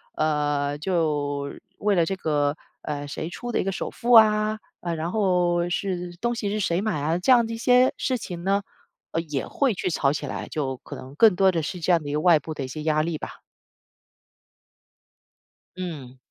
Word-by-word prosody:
呃， 145 -2 0
就 150 -5 -1 0.2
为 210 0 +1
了 175 -3 +3
这 195 +4 -1
个， 150 -4 0 0.2
呃， 145 -1 -4
谁 160 +3 -5
出 240 +7 -6
的 - - 0
一 - - +1
个 195 - -1
首 - - -4
付 240 - -2
啊？ 215 -1 +6 0.2
呃， 170 -1 -2
然 165 +2 -3
后 180 -4 +1
是 180 -1 -3
东 235 +4 0
西 215 -3 -2
是 210 +1 -1
谁 175 -2 0
买 210 -8 -1
啊？ 160 +3 +1
这 190 +8 +2
样 240 -2 +6
的 225 - -5
一 - - -4
些 250 +2 +4
事 255 - 0
情 175 -6 -7
呢， 200 +2 +1 0.5
呃， 165 - 0
也 150 -5 -4
会 270 -5 +1
去 185 - -2
吵 140 -5 +1
起 150 - -3
来， - - -5
就 135 -4 -2
可 145 - -8
能 130 +2 -11
更 220 +5 +6
多 195 -1 +5
的 170 -2 -1
是 180 +4 -4
这 170 +2 +1
样 165 -2 +2
的 145 - -5
一 - - -3
个 150 - +1
外 165 -1 +5
部 155 +2 -6
的 140 -3 -4
一 - - -6
些 150 +4 -6
压 155 -1 +2
力 165 0 -2
吧。 - - -8 2.4
嗯。 150 -9 -6
170 Hz, 225 characters per minute, -25 LUFS, 150-200 Hz, 2.4 s, 啊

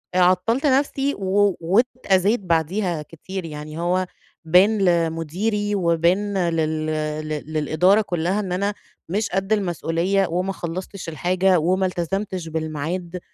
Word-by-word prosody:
آآ - - +3
عطّلت 185 +9 +2
نفسي 275 0 +2
و 200 0 +2
وأتأذيت 205 +2 +2
بعديها 170 0 0
كتير 170 +4 -7
يعني 155 0 -7
هو 180 +2 +1 0.4
بان 185 +7 +5
لمديري 180 +4 0
وبان 180 +2 +1
لل 155 -1 -1 0.4
ل - - -6 0.2
للإدارة 160 +7 +3
كلّها 180 0 -1
إن 195 -3 -3
أنا 200 +3 0 0.4
مش 205 +4 -1
قد 195 +3 0
المسؤوليّة، 185 0 0
وما 180 +3 -1
خلصتش 185 +1 -6
الحاجة، 180 +4 +2
وما 185 +4 +1
التزمتش 185 0 -3
بالميعاد، 160 +3 -4
185 Hz, 120 wpm, -22 LUFS, 165-200 Hz, 0.4 s, بان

